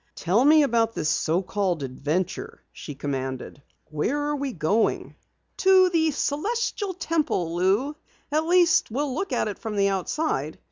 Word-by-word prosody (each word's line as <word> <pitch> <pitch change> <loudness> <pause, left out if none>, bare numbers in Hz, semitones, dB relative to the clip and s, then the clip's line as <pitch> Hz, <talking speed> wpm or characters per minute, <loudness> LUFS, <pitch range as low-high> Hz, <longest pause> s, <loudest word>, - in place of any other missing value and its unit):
"Tell 195 +8 +2
me 305 +2 +6
about 230 -4 +1
this 155 -2 -1
so 165 +4 +1
called 185 -5 -1
adventure," 150 +8 -3
she 145 - -8
commanded. 135 -1 -5 0.3
"Where 190 - -1
are 295 0 -1
we 280 -1 -3
going?" 200 +4 0 0.4
"To 375 -1 +5
the 320 -2 +2
Celestial 390 - -2
Temple, 305 - -1
Lou. 200 +12 +1 0.4
At 310 +2 0
least, 350 -1 +4
we'll 270 +4 -2
look 390 +8 -3
at - - 0
it 205 - -5
from 220 -2 -5
the 200 -1 +2
outside. 190 - -2
230 Hz, 150 wpm, -25 LUFS, -, 0.4 s, me